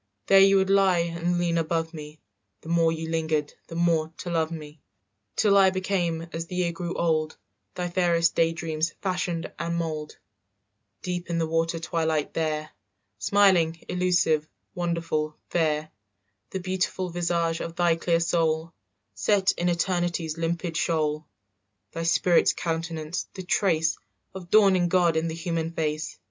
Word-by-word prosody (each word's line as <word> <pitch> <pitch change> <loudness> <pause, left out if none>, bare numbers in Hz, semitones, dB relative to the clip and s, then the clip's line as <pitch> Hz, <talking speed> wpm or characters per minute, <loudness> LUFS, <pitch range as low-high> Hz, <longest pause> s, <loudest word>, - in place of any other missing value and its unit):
"There 195 - +6
you 195 0 +6
would 190 0 +2
lie 195 -2 +4 0.2
and 175 +1 -1
lean 170 -1 +1
above 165 0 -1
me, 150 -1 -9 0.4
The 160 - -10
more 165 -1 +3
you 160 0 -4
lingered 160 -2 -1
the 165 - -8
more 165 -2 +1
to 175 - -5
love 160 -2 +1
me, 155 -2 -9 0.5
"Till 205 -2 +3
I 195 -1 +7
became, 180 -3 -1
as 165 0 -4
the 180 - -7
year 180 -1 +1
grew 170 +1 -5
old, 155 -2 0 0.4
Thy 180 -1 -2
fairest 170 -2 +2
day 165 0 +3
dream's 160 -1 -2
fashion 180 -3 -1
and 170 0 -2
mould, 155 -3 -4 0.9
"Deep 180 -1 -4
in 170 - -1
the 165 - +1
water 165 +1 0
twilight 160 -2 -1
there, 155 -1 -2 0.5
Smiling, 170 - +3
elusive, 175 -4 +2 0.3
wonderful, 165 -3 -2
fair, 155 -2 0 0.6
"The 190 - -4
beautiful 185 0 -2
visage 170 -1 0
of 165 0 -5
thy 170 -1 +3
clear 165 0 +1
soul 165 -1 0 0.4
Set 190 - +2
in 175 +1 -1
eternity's 175 -2 -1
limpid 165 0 -2
shoal, 155 -2 0 0.6
"Thy 165 - -5
spirit's 170 +1 +3
countenance, 165 -1 -3
the 190 - -6
trace 165 -4 +1 0.3
Of 185 -2 -9
dawning 195 -4 +5
God 175 -2 +3
in 160 +1 0
the 160 - -4
human 165 -1 -2
face. 155 -1 -2
165 Hz, 150 wpm, -26 LUFS, 160-175 Hz, 0.9 s, I